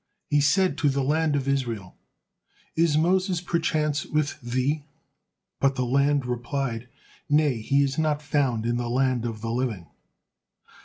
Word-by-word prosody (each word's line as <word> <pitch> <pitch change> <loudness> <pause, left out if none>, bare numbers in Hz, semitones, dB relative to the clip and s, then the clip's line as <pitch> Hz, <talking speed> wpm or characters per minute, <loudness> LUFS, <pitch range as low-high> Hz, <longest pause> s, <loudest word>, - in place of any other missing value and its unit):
He 145 0 +4
said 185 +6 +2
to 145 - +3
the 135 0 0
land 155 +2 +1
of 140 -1 -1
Israel, 120 -9 -2 0.8
"Is 160 -2 +3
Moses 185 +2 +2
perchance 155 -3 0
with 155 -1 -2
thee?" 130 +5 -1 0.8
But 135 -1 +2
the 130 - 0
land 140 +2 +2
replied, 125 -1 -3 0.4
"Nay, 145 -5 +2
he 140 +5 +2
is 135 +2 -1
not 150 -1 0
found 135 -6 0
in 120 0 0
the 120 -1 -2
land 130 -1 +1
of 110 -2 -4
the 115 0 -3
living." 115 -7 -2
140 Hz, 150 wpm, -25 LUFS, 120-150 Hz, 0.8 s, He